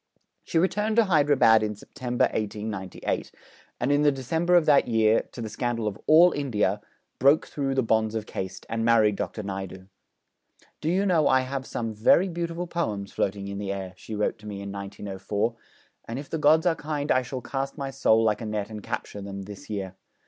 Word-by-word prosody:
She - - -2
returned 210 +5 +1
to 230 -1 +5
Hyderabad 145 - +5
in 105 -1 -2
September 120 +4 -3
1898, 105 -3 -3 0.5
and 125 +4 +1
in 145 +1 +3
the 150 -1 +5
December 160 +7 0
of 170 -3 +5
that 145 -3 +5
year, 110 -1 +2
to 120 - -7
the - - -4
scandal 115 0 -2
of 105 0 -4
all 170 +3 +7
India, 105 -9 0 0.4
broke 140 +3 +5
through 135 -2 -2
the 130 - +2
bonds 110 -1 +1
of 110 -1 -2
caste, 95 -3 -6
and 115 0 -2
married 110 -3 +4
Dr. 110 - -4
Naidu. 95 -1 -6 1.0
'Do 155 - -1
you 190 +4 +2
know 170 -6 +3
I 130 0 +4
have 130 +1 -4
some 115 -2 -3
very 115 - +4
beautiful 170 0 -3
poems 110 - -3
floating 100 0 -2
in 100 0 -5
the 100 -1 -3
air,' 95 -2 -5
she 110 +3 -8
wrote 105 +1 -1
to 105 - -11
me 100 -1 -6
in 100 - -6
1904; 100 +2 -3 0.5
'and 115 - -4
if 140 +1 -8
the 160 - -1
gods 155 +3 +4
are 175 - +4
kind 150 -1 -3
I 130 - +4
shall 130 +1 -6
cast 135 +3 -4
my 135 -1 -4
soul 115 -4 +3
like 110 0 +1
a - - -4
net 105 0 -3
and 105 -1 -6
capture 110 -2 -5
them, 100 0 -6
this 105 +8 -11
year. 95 -3 -4
115 Hz, 200 wpm, -26 LUFS, 105-145 Hz, 1.0 s, all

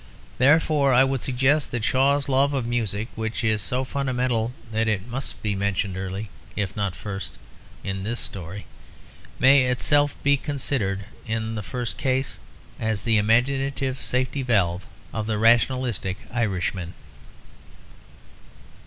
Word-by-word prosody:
Therefore 145 0 +4
I 130 - +7
would 135 -2 0
suggest 135 +3 +2
that 120 -3 -3
Shaw's 140 +4 +2
love 140 +1 +3
of 130 -3 -1
music 115 -2 -1
(which 110 +1 -3
is 110 -2 +2
so 125 +4 -1
fundamental 125 -4 0 0.2
that 110 0 +1
it 105 -3 0
must 130 +2 -4
be 105 -2 0
mentioned 100 -1 -1
early, 95 +2 -5 0.2
if 100 -2 -2
not 100 -4 -1
first, 95 -5 -6 0.5
in 95 -1 -3
his 115 +4 -2
story) 95 0 -6 0.7
may 135 0 +6
itself 145 +4 +2
be 140 0 +4
considered 130 -9 -2 0.2
in 110 0 -2
the 105 - -3
first 120 +3 -4
case 130 -1 0 0.4
as 110 -2 -1
the 115 -2 +3
imaginative 135 +4 +1
safety 130 +2 -1
valve 95 -7 +1 0.3
of 110 -1 -2
the 110 -1 0
rationalistic 115 -3 +2 0.2
Irishman. 95 -6 -1
115 Hz, 135 wpm, -24 LUFS, 100-130 Hz, 0.7 s, I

